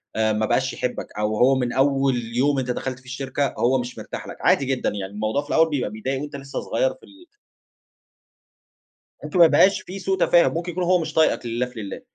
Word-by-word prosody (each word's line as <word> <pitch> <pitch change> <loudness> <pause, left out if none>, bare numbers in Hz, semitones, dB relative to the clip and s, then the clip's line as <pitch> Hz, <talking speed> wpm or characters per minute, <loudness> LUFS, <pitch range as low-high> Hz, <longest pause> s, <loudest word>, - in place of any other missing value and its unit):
أ 110 -1 +2
ما 110 +1 0
بقاش - - 0
يحبك. - - -3
أو 105 0 -1
هو 135 +2 +4
من 125 -2 -1
أول 135 -1 +2 0.2
يوم 140 +2 +2
أنت 125 -1 -2
دخلت 130 +1 -4
فيه 130 - -25
الشركة، 135 +2 -2
هو 130 +2 +2
مش 120 0 -6
مرتاح - - -7
لك - - -8
عادي 135 - +3
جدًا. 130 -1 0
يعني 100 -1 -6
الموضوع 110 +6 -1
في 145 - -17
الأول 160 0 +4
بيبقى 135 -8 -1
بيضايق 130 +6 -4
وأنت 145 -1 -7
لسّه 135 0 -6
صغير - - 0
في - - -24
ال 325 +4 -18 2.0
ممكن 185 - -2
ما 170 - +10
يبقاش 190 +4 +4
فيه 195 +2 -8
سوء 190 +1 -1
تفاهم، 175 -1 +4
ممكن 170 +2 -3
يكون 180 +1 -2
هو 180 0 +3
مش 155 -1 -5
طايقك 160 -5 +2
لله 120 +2 -1
في 125 -2 -10
لله. 100 - -7
135 Hz, 215 wpm, -23 LUFS, 120-160 Hz, 2.0 s, ما